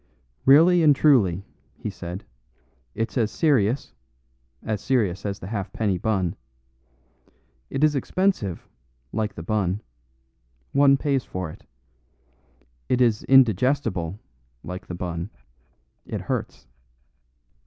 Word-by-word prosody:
"Really 165 +6 +7
and 150 -3 +6
truly," 100 - +3 0.3
he - - -5
said, 90 +3 -7 0.7
"it's 115 +3 -2
as 110 -2 +2
serious 130 -5 +1 0.7
as 110 -2 -2
serious 105 -7 0
as 100 -1 -3
the - - -10
halfpenny 100 -1 -2
bun. 95 -4 0 1.3
It 135 - -2
is 155 -1 +5
expensive, 140 - -1 0.4
like 110 -1 -2
the 85 - -7
bun; 100 0 -1 0.9
one 140 0 +5
pays 135 -2 0
for 90 -3 -5
it. - - -16 1.2
It 125 - +2
is 115 -4 +3
indigestible, 125 - +3 0.5
like 90 +3 -7
the 90 - -5
bun. 85 +1 -4 0.8
It - - -4
hurts." - - -4
110 Hz, 110 wpm, -24 LUFS, 95-135 Hz, 1.3 s, Really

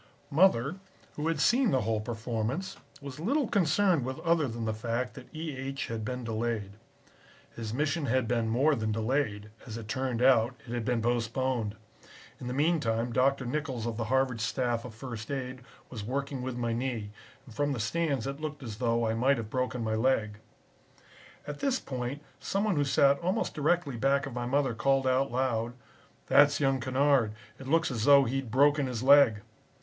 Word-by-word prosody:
"Mother, 155 -1 +3 0.4
who 150 +2 -2
had 165 -2 0
seen 245 - +4
the 130 -2 +2
whole 110 0 -1
performance, 115 - -3 0.3
was 140 0 -8
little 265 - +1
concerned 185 -4 +2
with 130 +1 -4
other 165 -3 +2
than 115 -1 -4
the 110 - -1
fact 115 +3 -3
that - - -11
E. 155 -2 -5
H. 135 +1 -4
had 115 -1 -3
been 125 +2 -4
delayed. 115 -3 -2 0.8
His 110 -2 -5
mission 145 +4 -1
had 125 -1 +1
been 115 -1 0
more 135 +7 +3
than 110 -5 -1
delayed 110 -2 -1 0.2
as 115 -1 -6
it 115 -2 -8
turned 125 0 -1
out, 125 -2 +4
it 115 - -7
had 120 -2 -2
been 120 -2 0
postponed. 120 -1 -1 0.6
In 125 - -7
the - - -3
meantime 125 -7 +1
Dr. 135 +1 +2
Nichols 130 -3 -3
of 115 -2 -3
the 115 - -2
Harvard 130 -1 +1
staff 120 0 -1
of 115 -3 -9
first 115 -2 -7
aid 130 -2 -4 0.3
was 110 -5 -6
working 135 +3 -3
with 125 -1 -4
my 120 -1 -1
knee, 115 -4 -3 0.3
and 120 - -13
from 145 +4 0
the 135 - -2
stands 140 0 -1
it 140 +2 -5
looked 150 -2 -5
as 110 -4 -6
though 115 -1 +1
I 110 - 0
might 130 +4 +2
have 110 -2 -6
broken 125 -2 -1
my 110 -1 -1
leg. 110 -2 +1 1.1
"At 145 -1 -6
this 270 -2 +1
point 130 +2 -5 0.2
some 195 +1 -1
one 215 -4 +1
who 145 -1 +2
sat 140 0 +4
almost 180 +2 -1
directly 155 -3 0
back 135 +4 +2
of 135 - -7
my 120 0 -3
mother 135 -1 +1
called 135 +3 +1
out 130 +1 +2
loud, 120 -2 -1 0.5
'That's 145 0 +5
young 135 -2 +2
Kennard. 130 -3 +2 0.3
It 135 - -9
looks 165 +1 +2
as 115 -3 -2
though 140 -1 +7
he'd 135 0 -2
broken 145 +3 +3
his 125 -2 -4
leg.' 135 -6 +6
130 Hz, 190 wpm, -29 LUFS, 115-140 Hz, 1.1 s, though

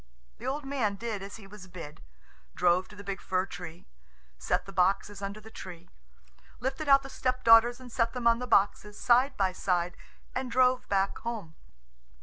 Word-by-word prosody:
The - - -6
old 285 +2 -2
man 255 -7 -1
did 215 -1 -4
as 195 +1 -8
he 220 - -12
was 195 -1 -12
bid 165 -4 -10 0.5
drove 180 +1 +3
to 210 - -14
the 205 - -10
big 195 -2 -5
fir 185 0 0
tree, 175 -3 -9 0.5
set - - 0
the 195 - -9
boxes 195 +2 +1
under 200 +1 -5
the 220 +1 -14
tree, 175 -6 -10 0.7
lifted 265 +4 -3
out 275 0 +7
the - - -7
stepdaughters 240 -2 +4
and 250 -1 -11
set 230 0 0
them 250 -2 -5
on 230 0 +5
the 250 - -4
boxes 210 0 +2
side 255 +3 +3
by 190 -2 +2
side, 180 -1 -1 0.4
and 255 0 -3
drove 255 +1 +2
back 195 0 +1
home. 220 -9 -5
210 Hz, 180 wpm, -29 LUFS, 190-250 Hz, 0.7 s, out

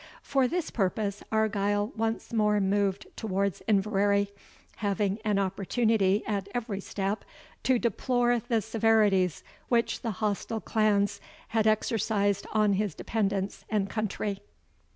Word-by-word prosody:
For 270 -2 +2
this 340 +3 -2
purpose, 200 0 -1
Argyle 205 0 +1
once 225 +1 -2
more 210 -2 +3
moved 200 0 +1
towards 200 -3 -1
Inverary, 200 -1 +2 0.5
having 205 0 0
an 210 -2 +1
opportunity, 200 +1 +1
at 200 -2 -2
every 225 -5 -2
step, 195 +2 -3 0.4
to 260 -1 +3
deplore 240 +1 +1
the 225 -3 +1
severities 215 -5 +2 0.3
which 235 -1 +1
the 230 - -2
hostile 215 +1 -1
clans 205 -2 +1 0.3
had 220 -1 +2
exercised 205 -2 +1
on 210 -2 +3
his 200 -4 -1
dependants 200 -3 -2
and 205 -2 0
country. 210 -2 -2
210 Hz, 120 wpm, -28 LUFS, 200-225 Hz, 0.5 s, more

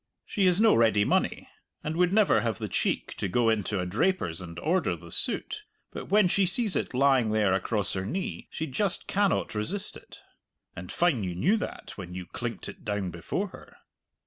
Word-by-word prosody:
She 195 -3 +1
has 180 +1 +3
no 225 0 +6
ready 110 -3 +4
money, - - 0 0.4
and 155 +1 -3
would 180 +1 +3
never 210 0 +4
have 115 -2 -1
the 110 -2 -4
cheek - - -1
to - - -1
go 115 +5 +2
into 105 -2 0
a 90 - -1
draper's 95 - 0
and 85 -2 -9
order 165 - +1
the 85 0 -13
suit; - - -2 0.3
but - - -6
when 205 0 +5
she 190 +1 +2
sees 205 +2 +2
it - - -2
lying 130 -3 +4
there 105 -3 +2
across 100 +2 0
her 95 - -2
knee, 175 - -4
she 160 - -4
just 165 +7 -1
cannot 200 0 +1
resist 160 - -3
it. - - -13 0.6
(And 90 0 -7
fine 160 - +2
you 90 -2 -3
knew 180 - +3
that - - -6
when 90 -2 -7
you 90 -1 -5
clinked - - -5
it - - -10
down 105 -3 -2
before 175 - -3
her!) - - -14
115 Hz, 200 wpm, -28 LUFS, -, 0.6 s, no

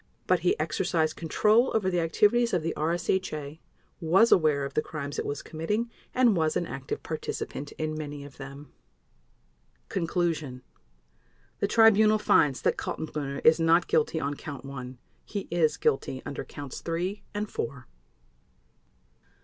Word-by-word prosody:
But 185 -1 +3
he 175 -1 +1
exercised 160 0 0
control 215 +9 +3
over 210 -4 +1
the 175 - +1
activities 210 +8 +3
of 170 - 0
the 165 - -1
RSHA, 160 -2 -1 0.4
was 190 +7 +4
aware 150 -5 +4
of 140 - -6
the - - +2
crimes 145 -3 -5
it - - -2
was 145 0 -4
committing, 210 +9 -2 0.2
and 250 -5 +4
was 160 -2 +1
an 175 - -1
active 135 -4 -5
participant 150 -2 -5
in 155 0 -3
many 145 -2 -6
of 145 - -13
them. 140 +1 -10 1.2
Conclusion. 165 -7 -1 1.0
The 200 - +1
Tribunal 215 0 +6
finds 145 -9 +3
that - - +2
Kaltenbrunner 140 -3 -4
is 160 +2 +7
not 165 +2 +4
guilty 160 +1 +1
on 140 -1 -2
Count 140 -2 -8
One. 130 -2 -7 0.3
He 200 -2 -5
is 165 -3 +2
guilty 130 -1 0
under 140 -1 -4
Counts 140 -2 -8
Three 180 +5 -2
and 210 +1 -1
Four. 140 -10 -5
160 Hz, 145 wpm, -28 LUFS, 145-185 Hz, 1.2 s, is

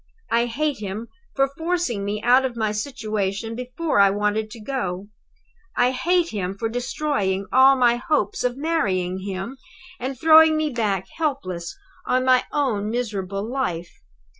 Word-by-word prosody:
I 235 +1 +3
hate 290 +3 -1
him 210 +3 -5 0.3
for 275 0 +3
forcing 320 - -2
me 210 +1 -3
out 250 +2 +5
of 250 -3 -3
my 215 -2 0
situation 215 -3 -3
before 250 +4 -2
I 200 0 +7
wanted 210 +2 0
to 225 - -10
go. 205 -6 -4 0.7
I 245 +1 +4
hate 345 +6 +1
him 195 -2 -3
for 225 +2 -2
destroying 240 -5 -1
all 265 +1 +7
my 240 -2 +3
hopes 315 +9 0
of 250 0 0
marrying 190 - 0
him, 195 +6 -5 0.4
and 260 +1 -4
throwing 315 +1 +7
me 310 -1 0
back 205 -6 -1
helpless 185 - -3 0.3
on 255 0 +2
my 255 -1 +4
own 230 -8 0
miserable 200 -5 -3
life. 180 -10 -3
235 Hz, 150 wpm, -23 LUFS, 200-275 Hz, 0.7 s, I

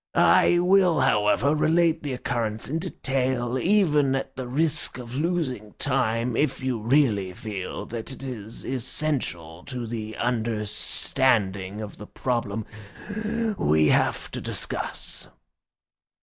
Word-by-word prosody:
I 175 - +5
will, 180 -3 +4
however, 110 +3 +3
relate 165 +1 +3
the 145 -3 -3
occurrence 115 -3 -2
in 155 +4 -1
detail, 130 -7 -1
even 150 -7 +3
at 135 - -4
the 130 -1 -5
risk 150 +3 0
of 120 -1 -8
losing 135 - -2
time, 125 -3 0
if 150 - +1
you 130 -3 -1
really 110 -7 +2
feel 95 -2 -5
that 115 +2 -5
it 135 - -8
is 115 -4 -6
essential 120 - -3
to 125 -3 -5
the 110 -1 -5
understanding 105 -3 0
of 105 -1 -7
the 105 - -9
problem 115 -4 -2 0.9
we 75 0 +4
have - - +1
to - - -5
discuss." - - -3
125 Hz, 120 wpm, -25 LUFS, 110-140 Hz, 0.9 s, I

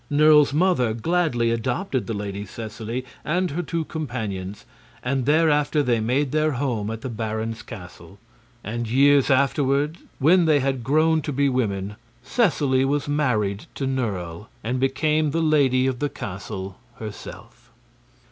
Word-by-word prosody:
Nerle's 150 0 +5
mother 145 -8 +2
gladly 125 -4 +1
adopted 130 - -1
the 115 - -2
Lady 100 0 -4
Seseley 110 +4 -6 0.2
and 180 +2 0
her 165 +5 -2
two 165 -1 -3
companions, 105 - -5 0.4
and 130 0 -1
thereafter 150 -1 +3
they 120 -4 +1
made 130 +5 0
their 155 0 +1
home 120 -6 -1
at 115 0 -5
the - - -4
baron's 110 0 -3
castle. 90 -4 -11 0.5
And 115 +1 -4
years 140 +2 +4
afterward, 140 +3 +2 0.2
when 170 +5 +4
they 155 -2 +4
had 135 -2 -1
grown 155 +4 +3
to 150 - -4
be 140 +1 +2
women, 105 -5 -2 0.3
Seseley 145 - +2
was 140 +1 0
married 110 -9 0
to 135 - -2
Nerle 105 -8 -3 0.2
and 125 +3 -1
became 150 +3 +1
the 165 +3 0
lady 135 -5 +3
of 130 -2 -1
the 145 - 0
castle 95 -4 -7 0.2
herself. 110 -2 -10
130 Hz, 145 wpm, -23 LUFS, 110-150 Hz, 0.5 s, Nerle's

